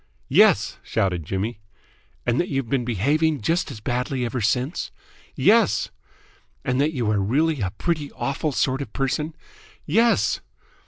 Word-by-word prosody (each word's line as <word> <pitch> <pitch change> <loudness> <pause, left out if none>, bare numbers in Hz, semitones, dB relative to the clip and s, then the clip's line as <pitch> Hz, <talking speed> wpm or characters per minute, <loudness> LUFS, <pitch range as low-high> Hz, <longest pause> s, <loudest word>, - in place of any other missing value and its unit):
"Yes!" - - +4
shouted 90 -5 -1
Jimmy. 100 +3 -2 0.7
"And 120 0 +1
that 175 - -3
you've 135 -5 -2
been 135 -1 +1
behaving 140 - +1
just 165 - 0
as 125 -6 -8
badly 125 +2 -1
ever 120 +1 -3
since?" 125 +8 0 0.5
"Yes!" - - +3 0.7
"And 125 +2 +1
that 150 +2 +2
you 120 -6 0
are 105 - +1
really 140 +8 +1
a 95 - 0
pretty 150 - -2
awful 140 +3 -2
sort 130 +3 0
of 140 - -7
person?" 150 +3 -1 0.5
"Yes!" 230 +1 +3
130 Hz, 145 wpm, -23 LUFS, 115-150 Hz, 0.7 s, Yes